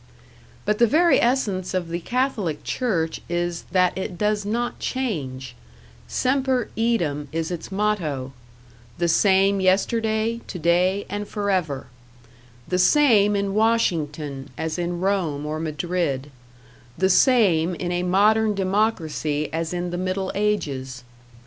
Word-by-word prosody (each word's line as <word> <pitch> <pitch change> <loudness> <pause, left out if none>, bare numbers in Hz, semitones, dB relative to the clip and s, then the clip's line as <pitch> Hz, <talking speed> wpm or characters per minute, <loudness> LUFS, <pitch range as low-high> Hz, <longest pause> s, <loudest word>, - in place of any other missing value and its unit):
But 210 0 0
the 235 - +6
very 335 +7 +4
essence 205 -8 0
of 175 -2 -2
the 170 +1 -2
Catholic 215 - -1
Church 170 -11 -1
is 175 0 -2
that 180 -1 +3
it 190 -1 -4
does 210 0 0
not 240 +3 -2
change; 135 - -3 0.5
#semper 260 -2 0
eadem# 170 -11 0
is 165 +2 -2
its 175 +1 -6
motto: 170 -11 -1 0.6
the 175 - +1
same 195 +3 +3
yesterday, 220 +4 +1
today 180 +3 +1
and 205 0 -4
forever 185 -10 -1 0.8
the 180 - 0
same 210 -3 +5
in 200 -1 -1
Washington 155 -11 0
as 160 +2 -3
in 175 0 -2
Rome 175 -7 0
or 155 +1 -3
Madrid 155 -3 -2 0.7
the 190 - +3
same 185 - +4
in 175 +1 -3
a 175 0 0
modern 210 +4 +3
democracy 185 -7 -1
as 165 0 -2
in 175 0 -3
the 175 - -3
Middle 185 +1 -2
Ages. 140 -12 -2
185 Hz, 125 wpm, -23 LUFS, 160-210 Hz, 0.8 s, the